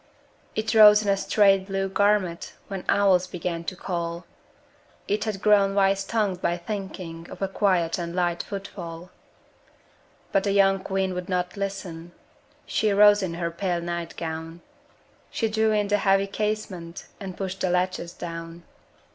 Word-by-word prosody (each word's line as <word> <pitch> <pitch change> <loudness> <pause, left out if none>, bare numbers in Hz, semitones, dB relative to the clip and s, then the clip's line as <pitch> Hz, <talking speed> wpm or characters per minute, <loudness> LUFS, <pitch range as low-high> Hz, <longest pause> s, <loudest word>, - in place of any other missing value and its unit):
It 220 +1 -1
rose 210 -1 +8
in 205 - -1
a 200 - +4
straight 195 -1 +3
blue 195 -1 -1
garment, 195 -3 +1 0.2
When 195 -2 -5
owls 195 -2 +4
began 170 -1 -4
to 185 - -4
call: 170 -1 -4 0.8
It 210 +2 0
had 210 -3 -4
grown 200 -2 +4
wise 195 0 +3
tongued 200 -4 -1
by 175 - 0
thinking 175 -3 -6
Of - - -10
a - - +1
quiet 185 -4 +1
and 170 0 -4
light 175 -1 0
footfall; 180 -3 -8 1.2
But 195 - +2
the 200 - 0
young 195 -1 +4
queen 190 -1 -1
would 180 +1 -5
not 180 0 -1
listen; 185 -4 -5 0.5
She 215 -1 +1
rose 205 +1 +6
in 175 -3 -3
her 170 -1 -2
pale 175 0 -1
night 170 -1 -5
gown; 165 +1 -5 0.7
She 225 - -1
drew 220 0 +1
in 210 -1 +1
the 205 - +3
heavy 195 0 +3
casement 200 -4 -4
And 190 -2 -7
pushed 190 0 -4
the 185 - +1
latches 180 -1 -1
down. 165 0 -8
190 Hz, 155 wpm, -25 LUFS, 175-200 Hz, 1.2 s, rose